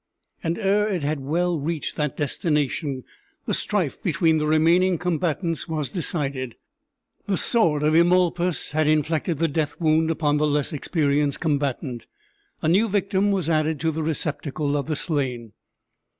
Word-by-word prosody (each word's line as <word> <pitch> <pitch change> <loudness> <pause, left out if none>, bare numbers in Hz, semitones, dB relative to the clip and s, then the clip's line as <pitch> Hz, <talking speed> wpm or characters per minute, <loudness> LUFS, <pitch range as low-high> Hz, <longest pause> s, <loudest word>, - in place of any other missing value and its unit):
And 165 +1 -1
ere 205 +2 +2
it 185 -7 -2
had 150 +1 -1
well 165 +5 0
reached 155 +2 -3
that 150 -3 -2
destination 145 -2 -1 0.4
the - - -1
strife - - -1
between 160 -1 +2
the 150 - -1
remaining 170 +4 +3
combatants 170 -1 -1
was 155 -4 -3
decided. 140 - -2 0.7
The 195 -2 +1
sword 165 -11 +3
of 155 +1 +3
Eumolpus 175 0 +2
had 155 +1 +1
inflicted 155 +1 +1
the 165 +2 +1
death 150 -1 -2
wound 160 -1 +2
upon 150 -2 +1
the 150 +1 +2
less 150 +2 0
experienced 145 -1 0
combatant. 140 -5 -2 0.6
A - - +1
new 200 +7 +3
victim 195 0 +1
was 190 -5 0
added 155 -1 +1
to 160 0 +1
the 160 +1 -3
receptacle 150 -2 -2
of 145 0 -2
the 155 - -1
slain. 130 - -3
155 Hz, 150 wpm, -24 LUFS, 145-170 Hz, 0.7 s, remaining